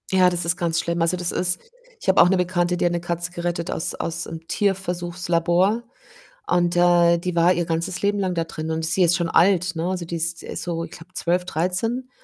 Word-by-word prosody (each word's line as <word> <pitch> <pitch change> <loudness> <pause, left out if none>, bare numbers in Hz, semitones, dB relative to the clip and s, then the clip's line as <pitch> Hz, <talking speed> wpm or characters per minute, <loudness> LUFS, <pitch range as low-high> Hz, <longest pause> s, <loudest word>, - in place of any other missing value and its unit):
Ja, 185 -1 +4
das 175 -1 -2
ist 170 +2 +1
ganz 165 -2 0
schlimm. 170 0 -2
Also, 165 +2 +2
das 175 0 -1
ist 180 0 0 0.4
ich - - -2
habe 190 - +4
auch 175 - +6
'ne 190 - +3
Bekannte, 180 -1 0
die - - 0
hat 175 - +2
'ne 175 - -1
Katze 175 +1 -3
gerettet 175 -1 -3
aus 180 - -1
aus 170 +1 -3
'nem 165 0 -9
Tierversuchslabor 180 +1 0 0.6
und, 175 -1 +1
äh, 175 -1 +5
die 175 +1 -4
war 170 +1 +4
ihr 175 -1 -1
ganzes 165 +2 -2
Leben 205 0 +1
lang 185 -2 0
da 165 -1 0
drin 160 0 -5
und 160 0 -2
sie 180 +3 +2
ist 170 0 +4
schon 170 -2 -1
alt, 180 -1 +3
ne? 165 +2 -2
Also, 180 -2 -3
die 170 - -5
ist 165 +1 -1
ist - - -5
so 165 -1 -3
ich - - -14
glaube, 175 +2 -13
12, 180 0 0
13 190 +10 -2
175 Hz, 230 wpm, -22 LUFS, 170-180 Hz, 0.6 s, auch